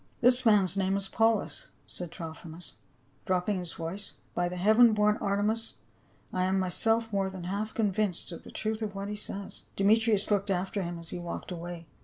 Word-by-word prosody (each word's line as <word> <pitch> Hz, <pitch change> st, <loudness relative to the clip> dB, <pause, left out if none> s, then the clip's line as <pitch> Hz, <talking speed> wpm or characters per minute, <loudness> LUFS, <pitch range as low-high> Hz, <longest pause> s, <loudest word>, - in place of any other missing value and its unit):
" -, -, -35 dB
This 250 Hz, +1 st, +8 dB
man's 200 Hz, -4 st, +5 dB
name 195 Hz, 0 st, +1 dB
is 195 Hz, -1 st, -1 dB
Paulus," 225 Hz, -, +1 dB, 0.2 s
said 175 Hz, -2 st, -6 dB
Trophimus, 165 Hz, 0 st, -8 dB, 0.5 s
ilropping 185 Hz, +1 st, +1 dB
his 175 Hz, -2 st, -2 dB
voice; 170 Hz, +5 st, -5 dB
" -, -, -35 dB
by 175 Hz, 0 st, 0 dB
the 180 Hz, -, -5 dB
heaven 220 Hz, +5 st, +6 dB
born 210 Hz, 0 st, +3 dB
Artemis, 210 Hz, +3 st, 0 dB, 0.6 s
I 185 Hz, 0 st, +1 dB
am 190 Hz, +1 st, +1 dB
myself 225 Hz, +4 st, +1 dB
more 195 Hz, -1 st, +1 dB
than 190 Hz, -2 st, -8 dB
half 200 Hz, +4 st, -3 dB
convinced 205 Hz, -4 st, 0 dB
of 170 Hz, -, -8 dB
the -, -, -11 dB
truth 220 Hz, +1 st, -3 dB
of 210 Hz, -2 st, -3 dB
what 200 Hz, +1 st, -4 dB
he 210 Hz, -, -3 dB
says." 200 Hz, -1 st, -6 dB
Demetrius 215 Hz, +1 st, +3 dB
looked 200 Hz, 0 st, +1 dB
after 190 Hz, +2 st, -1 dB
him 175 Hz, -1 st, -4 dB
as 170 Hz, -1 st, -6 dB
he -, -, -4 dB
walked 175 Hz, +2 st, -6 dB
away. 170 Hz, -1 st, -6 dB
195 Hz, 195 wpm, -29 LUFS, 180-215 Hz, 0.6 s, This